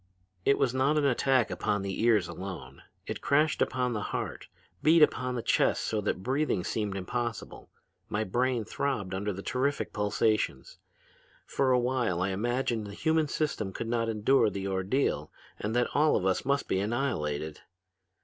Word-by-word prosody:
It 140 Hz, -, +4 dB
was 125 Hz, -, +1 dB
not 135 Hz, +4 st, +2 dB
an 150 Hz, -, +2 dB
attack 130 Hz, -3 st, +2 dB
upon 95 Hz, +2 st, -1 dB
the 95 Hz, 0 st, -3 dB
ears 110 Hz, -6 st, +3 dB
alone; 85 Hz, -9 st, -8 dB, 0.2 s
it -, -, -5 dB
crashed 150 Hz, +1 st, +2 dB
upon 125 Hz, -1 st, +1 dB
the 105 Hz, -, -2 dB
heart, -, -, -4 dB, 0.3 s
beat 160 Hz, +1 st, +6 dB
upon 125 Hz, -3 st, +1 dB
the 120 Hz, -, -3 dB
chest -, -, +2 dB
so 110 Hz, -1 st, -1 dB
that 95 Hz, -2 st, -2 dB
breathing 130 Hz, -6 st, 0 dB
seemed 105 Hz, -1 st, -2 dB
impossible. 115 Hz, +4 st, -4 dB, 0.4 s
My 105 Hz, +2 st, 0 dB
brain 120 Hz, +2 st, 0 dB
throbbed 105 Hz, -6 st, -2 dB
under 100 Hz, +2 st, -2 dB
the 100 Hz, 0 st, -7 dB
terrific 135 Hz, +3 st, -1 dB
pulsations. 110 Hz, -, 0 dB, 0.7 s
For 135 Hz, -1 st, +1 dB
a 125 Hz, -, +5 dB
while 120 Hz, -7 st, 0 dB
I 95 Hz, -, 0 dB
imagined 115 Hz, +2 st, -1 dB
the 100 Hz, -, -8 dB
human 160 Hz, +3 st, +1 dB
system 140 Hz, -10 st, -2 dB
could 115 Hz, -, -4 dB
not 115 Hz, -1 st, 0 dB
endure 110 Hz, +2 st, +3 dB
the 100 Hz, -1 st, -4 dB
ordeal 95 Hz, +8 st, 0 dB, 0.3 s
and 110 Hz, +3 st, -2 dB
that 120 Hz, 0 st, +2 dB
all 150 Hz, +2 st, +4 dB
of 95 Hz, -, 0 dB
us 95 Hz, -1 st, +1 dB
must 140 Hz, +1 st, +1 dB
be 95 Hz, -, +1 dB
annihilated. 80 Hz, -, -2 dB
115 Hz, 170 wpm, -29 LUFS, 100-130 Hz, 0.7 s, beat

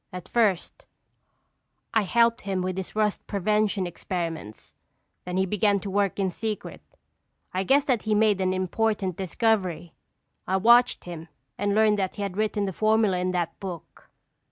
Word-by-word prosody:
At 180 Hz, 0 st, -8 dB
first 210 Hz, -7 st, 0 dB, 1.1 s
I 220 Hz, -, +4 dB
helped 230 Hz, +3 st, +2 dB
him 190 Hz, -2 st, -2 dB
with 185 Hz, 0 st, -2 dB
his 190 Hz, +1 st, -6 dB
rust 210 Hz, -1 st, 0 dB
prevention 210 Hz, -1 st, 0 dB
experiments, 165 Hz, -, -5 dB, 0.5 s
then 180 Hz, 0 st, -3 dB
he 190 Hz, -, +2 dB
began 205 Hz, +1 st, +2 dB
to 195 Hz, -, -5 dB
work 200 Hz, -2 st, +1 dB
in 190 Hz, -2 st, 0 dB
secret. 215 Hz, +3 st, -5 dB, 0.7 s
I 185 Hz, +1 st, 0 dB
guessed 275 Hz, +7 st, +3 dB
that 245 Hz, -6 st, +1 dB
he 220 Hz, -, -3 dB
had -, -, +3 dB
made 210 Hz, -3 st, +3 dB
an 185 Hz, 0 st, +1 dB
important 190 Hz, 0 st, -1 dB
discovery. 185 Hz, -3 st, -1 dB, 0.5 s
I 190 Hz, -, +2 dB
watched 240 Hz, +5 st, +5 dB
him 170 Hz, -2 st, -8 dB, 0.3 s
and 205 Hz, 0 st, -1 dB
learned 215 Hz, -1 st, +4 dB
that 190 Hz, -2 st, -2 dB
he 205 Hz, -, -4 dB
had 195 Hz, -2 st, -4 dB
written 210 Hz, -1 st, 0 dB
the 190 Hz, -, -3 dB
formula 215 Hz, -2 st, +2 dB
in 180 Hz, 0 st, -1 dB
that 170 Hz, -2 st, -2 dB
book." 185 Hz, -4 st, -9 dB
195 Hz, 165 wpm, -26 LUFS, 185-215 Hz, 1.1 s, watched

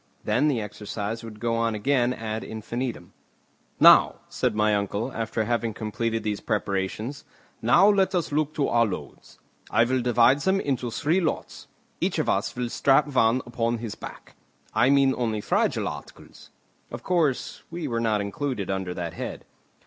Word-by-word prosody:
Then 150 Hz, -, +2 dB
the 135 Hz, -6 st, +1 dB
exercise 105 Hz, +1 st, -5 dB
would 110 Hz, -2 st, -9 dB
go 115 Hz, 0 st, -1 dB
on 115 Hz, -1 st, 0 dB
again 120 Hz, +3 st, +1 dB
ad 110 Hz, -2 st, -4 dB
infinitum. 115 Hz, +3 st, -5 dB, 0.7 s
"Now," -, -, +7 dB
said -, -, -1 dB
my 105 Hz, 0 st, +2 dB
uncle, 100 Hz, +4 st, -1 dB
after 115 Hz, 0 st, -2 dB
having 115 Hz, -1 st, -1 dB
completed 115 Hz, +1 st, -2 dB
these 105 Hz, -1 st, -2 dB
preparations, 105 Hz, +4 st, -2 dB, 0.4 s
"now 150 Hz, -, +5 dB
let 195 Hz, -2 st, +3 dB
us 170 Hz, -4 st, -1 dB
look 150 Hz, 0 st, 0 dB
to 145 Hz, -, +1 dB
our 120 Hz, 0 st, +3 dB
loads. 100 Hz, -, -8 dB, 0.3 s
I 115 Hz, -, +4 dB
will 130 Hz, +2 st, +1 dB
divide 120 Hz, +3 st, +4 dB
them 190 Hz, +5 st, +1 dB
into 130 Hz, -7 st, -1 dB
three 160 Hz, +10 st, +1 dB
lots; 165 Hz, -, -3 dB, 0.3 s
each -, -, 0 dB
of -, -, 0 dB
us -, -, 0 dB
will 125 Hz, -1 st, -2 dB
strap 135 Hz, +4 st, +3 dB
one 120 Hz, +1 st, +3 dB
upon 120 Hz, -1 st, -1 dB
his 115 Hz, -2 st, -5 dB
back. -, -, -10 dB, 0.4 s
I 120 Hz, +4 st, +4 dB
mean 135 Hz, -1 st, +4 dB
only 110 Hz, -3 st, -1 dB
fragile -, -, 0 dB
articles." -, -, -10 dB, 0.4 s
Of -, -, -8 dB
course, 165 Hz, -8 st, 0 dB
we 170 Hz, -2 st, -4 dB
were 115 Hz, -3 st, -1 dB
not 110 Hz, -2 st, +1 dB
included 100 Hz, 0 st, -3 dB
under 95 Hz, -2 st, -3 dB
that 85 Hz, -2 st, -4 dB
head. -, -, -6 dB
115 Hz, 165 wpm, -25 LUFS, 110-135 Hz, 0.7 s, Now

